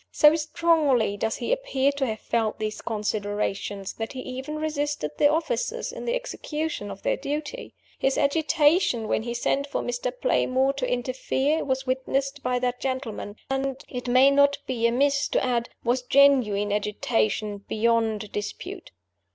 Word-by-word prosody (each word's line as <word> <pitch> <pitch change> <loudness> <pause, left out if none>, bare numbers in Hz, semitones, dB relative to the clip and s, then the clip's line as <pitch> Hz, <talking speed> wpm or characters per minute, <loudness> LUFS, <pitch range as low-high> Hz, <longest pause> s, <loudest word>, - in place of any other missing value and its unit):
So 300 0 +6
strongly 300 -9 +2
does 220 +2 -1
he - - -3
appear 285 - +1
to 280 -2 -1
have 220 -2 -4
felt 225 -2 0
these 215 0 -4
considerations, 205 -2 -2
that 225 +3 -5
he 260 - -5
even 260 +4 -6
resisted 295 - -2
the 290 - +6
officers 480 +9 -1
in - - -7
the 480 - 0
execution 315 - -4
of 195 - -9
their - - +1
duty. 295 - -5 0.2
His 270 - +1
agitation 295 - +2
when - - +1
he 235 +1 -4
sent 275 +4 0
for 280 - -2
Mr. 245 0 -2
Playmore 265 - +2
to 265 -2 -2
interfere 265 +4 0
was 265 -1 -1
witnessed 270 +2 -1
by 250 -1 0
that 245 0 -1
gentleman, 255 -6 -4 0.2
and 270 0 -1
(it 250 -1 -6
may 255 +3 +6
not 280 0 +4
be 235 -3 +1
amiss 280 +4 +2
to - - +1
add) 240 -2 0
was 245 +2 +1
genuine 250 -7 +4
agitation 210 0 0
beyond 220 0 0
dispute. 205 0 -6
260 Hz, 155 wpm, -25 LUFS, 225-285 Hz, 0.2 s, So